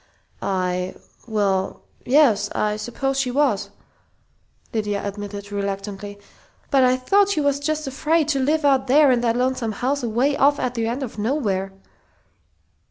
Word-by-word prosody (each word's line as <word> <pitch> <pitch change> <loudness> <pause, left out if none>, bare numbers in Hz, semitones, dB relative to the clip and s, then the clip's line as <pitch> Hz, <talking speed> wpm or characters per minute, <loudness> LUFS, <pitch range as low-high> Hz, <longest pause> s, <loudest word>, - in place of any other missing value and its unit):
"I 180 -1 -1 0.3
well, 200 -4 -1 0.2
yes, 240 -7 +4
I 210 0 0
suppose 265 +5 -2
she 265 -2 0
was," 265 -5 +1 1.0
Lydia 210 -2 -2
admitted 205 0 -7
reluctantly. 200 0 -4 0.5
"But 270 -2 +5
I 255 0 +4
thought 400 +10 +3
she 400 - 0
was 285 -1 +1
just 310 +1 -2
afraid 300 +3 +1
to 275 -3 +1
live 295 +3 +1
out 270 -1 +3
there 285 +1 +5
in 245 -1 +2
that 235 -1 +1
lonesome 250 -3 0
house 270 +6 -1
away 245 +5 +1
off 285 +1 +3
at 250 -1 -1
the 230 -2 -1
end 245 +4 -2
of 220 -4 -7
nowhere." 205 -6 -1
245 Hz, 150 wpm, -22 LUFS, 205-280 Hz, 1.0 s, But